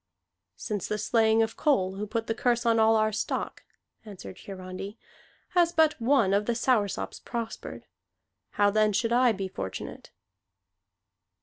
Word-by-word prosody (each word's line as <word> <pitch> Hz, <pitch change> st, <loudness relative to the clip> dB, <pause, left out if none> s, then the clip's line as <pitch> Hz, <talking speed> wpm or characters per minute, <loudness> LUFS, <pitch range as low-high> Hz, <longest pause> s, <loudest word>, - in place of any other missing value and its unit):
"Since 205 Hz, -5 st, -4 dB
the 210 Hz, -, -2 dB
slaying 225 Hz, +1 st, +3 dB
of 225 Hz, 0 st, -3 dB
Kol, 190 Hz, -11 st, +1 dB
who 205 Hz, +2 st, -5 dB
put 225 Hz, +1 st, -2 dB
the 225 Hz, -, -1 dB
curse 240 Hz, +1 st, 0 dB
on 230 Hz, -1 st, +3 dB
all 220 Hz, 0 st, +5 dB
our 215 Hz, 0 st, +2 dB
stock," 215 Hz, -, -3 dB, 0.4 s
answered 200 Hz, -3 st, -10 dB
Hiarandi, 190 Hz, +2 st, -8 dB, 0.5 s
"has 345 Hz, -2 st, +3 dB
but 315 Hz, -6 st, +2 dB
one 230 Hz, -5 st, +3 dB
of 205 Hz, +1 st, +1 dB
the 235 Hz, -, +1 dB
Soursops 225 Hz, -4 st, 0 dB
prospered. 230 Hz, -2 st, -6 dB, 0.7 s
How 205 Hz, 0 st, +3 dB
then 215 Hz, 0 st, +3 dB
should 230 Hz, +3 st, +1 dB
I 245 Hz, 0 st, +5 dB
be 195 Hz, -2 st, -3 dB
fortunate?" 95 Hz, -, -7 dB
220 Hz, 145 wpm, -27 LUFS, 205-235 Hz, 0.7 s, all